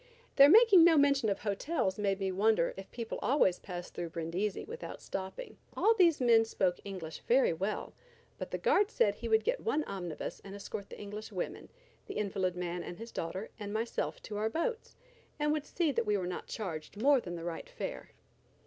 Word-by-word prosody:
Their 280 0 +9
making 415 -2 +8
no 330 -2 +6
mention 280 -5 +4
of 195 - -2
hotels 210 - -1
led 200 -1 0
me 195 -1 -1
to 185 - -4
wonder 205 -3 +3
if 195 0 -9
people 230 -2 -5
always 245 -10 +3
passed 175 -2 -7
through 170 - -4
Brindisi 170 +5 -2
without 475 +2 -7
stopping. 190 - -6 0.2
All 450 - +5
these 350 -7 +4
men 235 -3 +5
spoke 185 -5 0
English 185 -5 -7
very 255 -5 +4
well, 195 +6 -3 0.5
but - - -5
the - - -2
guard 410 0 +3
said 205 - +2
he 230 +3 -6
would 220 -1 +3
get - - 0
one 310 -9 0
omnibus 175 - -5
and 195 0 -9
escort 200 0 -7
the - - -10
English 210 +2 -7
women, 185 -3 -5 0.4
the - - -5
invalid 190 -3 -1
man 175 0 -3
and 175 - -7
his 230 +1 -9
daughter, 185 +6 -4
and 205 -1 -5
myself 225 +2 -2
to 210 - -6
our 215 +1 0
boats, 445 - -3 0.4
and 300 0 +1
would 305 -1 -1
see 335 -4 +1
that 235 -4 -1
we 210 -1 +2
were 185 - -2
not 180 0 -5
charged 185 -2 -6
more 275 +2 +5
than 175 -4 -6
the 165 - -6
right 175 - -5
fare. - - -6
210 Hz, 205 wpm, -32 LUFS, 185-285 Hz, 0.5 s, Their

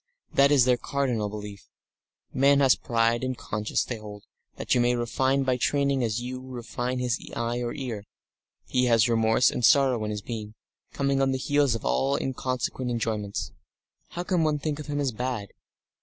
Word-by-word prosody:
That 140 +1 +5
is 135 -4 +5
their 125 -1 +3
cardinal 125 -5 -1
belief. 105 -1 -8 0.6
Man 140 +1 +4
has 135 -2 +5
pride 115 -1 +1
and 130 -1 -2
conscience, 105 0 -2
they 120 - -5
hold, 105 -1 -10 0.3
that - - -1
you 125 - +3
may 120 0 +2
refine 130 +3 +1
by 130 -1 +1
training 140 0 +1
as 115 -1 -1
you 130 +1 -5
refine 125 0 -4
his 125 -1 -1 0.2
eye 115 +1 -1
and 120 +3 -3
ear; 115 -7 -5 0.6
he 125 0 +1
has 115 -2 +4
remorse 115 +1 +3
and 125 - -4
sorrow 130 -3 +4
in 105 - -2
his 105 -1 -4
being, 110 -2 -6 0.4
coming 140 -1 0
on 135 0 +2
the - - 0
heels 145 -2 +2
of 115 - -6
all 135 - +1
inconsequent 130 -1 -2
enjoyments. 110 -3 -2 0.6
How 175 - -4
can 180 -2 +1
one 155 -1 +1
think 150 0 -3
of 150 - -7
him 145 -1 -2
as 140 -3 0
bad? 120 -3 -3
125 Hz, 185 wpm, -26 LUFS, 115-135 Hz, 0.6 s, That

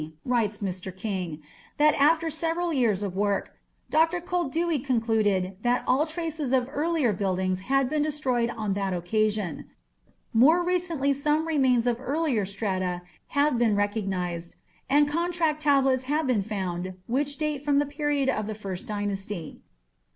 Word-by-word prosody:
writes 230 -5 +1
Mr. 190 -2 -4
King, 185 -7 -4 0.3
"that 300 0 +5
after 325 +3 +4
several 330 +2 -1
years 225 -8 +2
of 190 -2 -4
work, 200 0 0 0.4
Dr. 325 +3 +3
Koldewey 340 -2 -1
concluded 215 -7 +1
that 245 +1 +1
all 280 +5 +2
traces 315 -4 -3
of 255 -2 +2
earlier 300 -6 +1
buildings 185 -1 -1
had 270 +6 +1
been 300 +2 0
destroyed 270 -6 0
on 215 -4 -2
that 195 -1 -1
occasion. 210 +2 -1 0.6
More 305 +10 +5
recently 340 -6 0
some 300 +3 0
remains 260 -6 +3
of 245 0 0
earlier 270 -5 0
strata 185 -3 -2 0.3
have 285 -4 +3
been 225 -3 +3
recognized, 190 -5 -2 0.3
and 290 +2 +5
contract 330 -1 0
tablets 270 -3 +3
have 305 +1 +1
been 250 -6 +2
found 185 -3 -4
which 285 +3 -1
date 300 -2 -2
from 290 -1 +2
the 290 - +3
period 290 -1 -1
of 215 -5 0
the 215 - -4
First 200 +1 -6
Dynasty. 205 -4 -4
250 Hz, 145 wpm, -26 LUFS, 200-300 Hz, 0.6 s, that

